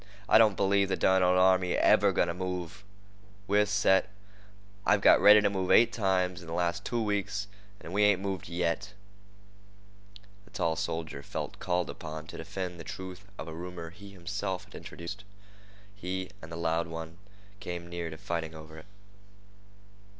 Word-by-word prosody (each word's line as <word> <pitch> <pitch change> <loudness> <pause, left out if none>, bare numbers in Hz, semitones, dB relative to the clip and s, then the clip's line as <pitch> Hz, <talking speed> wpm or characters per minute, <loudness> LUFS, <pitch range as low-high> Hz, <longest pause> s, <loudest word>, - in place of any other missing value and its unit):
"I - - +7
don't 110 -4 +5
believe 100 0 +2
the - - +1
derned 95 0 +3
old 90 0 +4
army's 95 -1 +4
ever - - +5
going - - +2
to 85 - -2
move. 90 +1 -5 0.6
We're 105 +1 +3
set. 100 -2 +3 0.7
I've 105 0 +4
got - - +6
ready 105 +1 +9
to 105 - +3
move 95 -2 -2
eight 115 - +6
times 90 -4 0
in 85 - -12
the 80 - -4
last 85 -1 0
two 120 -1 -1
weeks, 100 -1 -1 0.3
and 85 - -9
we 105 - +2
ain't 105 -2 +5
moved 95 -3 -4
yet." 90 +4 -2 1.5
The - - -19
tall 85 -7 -1
soldier 80 -3 -4
felt - - -6
called 90 -2 0
upon 80 0 -7
to - - -8
defend 90 -2 -5
the - - -7
truth 95 +3 -8
of - - -7
a 80 - -6
rumor 85 0 -7
he 100 +4 -13
himself 95 0 -4
had - - -19
introduced. 95 +5 -8 0.7
He 95 -1 -4
and 80 - -10
the 85 - -5
loud 85 0 0
one 80 +1 -7 0.4
came 85 -2 -6
near 85 -1 -4
to 80 - -8
fighting 80 -1 -4
over 80 0 -10
it. - - -16
90 Hz, 170 wpm, -29 LUFS, 85-100 Hz, 1.5 s, ready